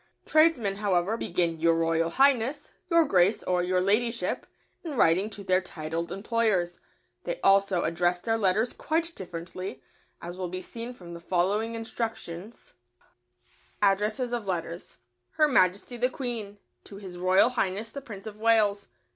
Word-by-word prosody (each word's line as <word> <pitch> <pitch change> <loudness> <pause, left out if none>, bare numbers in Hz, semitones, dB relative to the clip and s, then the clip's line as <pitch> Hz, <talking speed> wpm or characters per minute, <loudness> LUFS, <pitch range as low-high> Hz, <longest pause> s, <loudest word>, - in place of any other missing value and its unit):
Tradesmen, 310 -11 +3
however, 200 0 +1
begin 170 -6 -1
"Your 165 0 +3
Royal 165 0 +1
Highness," 270 - +2 0.2
"Your 335 -2 +5
Grace," 195 -2 +3
or 180 -1 +1
"Your 180 +1 +1
Ladyship," 230 +5 0 0.4
in 315 -5 -5
writing 185 +3 +3
to 205 -2 -8
their 185 -1 +2
titled 165 -1 -5
employers. 195 -4 0 0.4
They - - -4
also 195 -2 +3
address 175 +1 +1
their 225 +4 -1
letters 210 +4 +2
quite 330 +1 -1
differently, 175 - -7 0.4
as 175 +2 -8
will 180 -1 -3
be 185 +1 -4
seen 230 +5 -7
from 175 -8 -11
the 170 - -8
following 200 +6 0
instructions: 225 -3 -6 1.1
ADDRESSES 210 +5 +1
OF 235 -4 -3
LETTERS. 170 -1 -4 0.4
Her 305 - +4
Majesty 200 -1 +2
the 250 +2 +1
Queen. 235 -6 -5 0.3
To 200 - -10
His 185 -3 -9
Royal 185 +5 +4
Highness 220 -2 -2
the 280 - -7
Prince 210 -7 -10
of 215 -1 -9
Wales. 215 -3 +3
200 Hz, 145 wpm, -27 LUFS, 180-230 Hz, 1.1 s, Your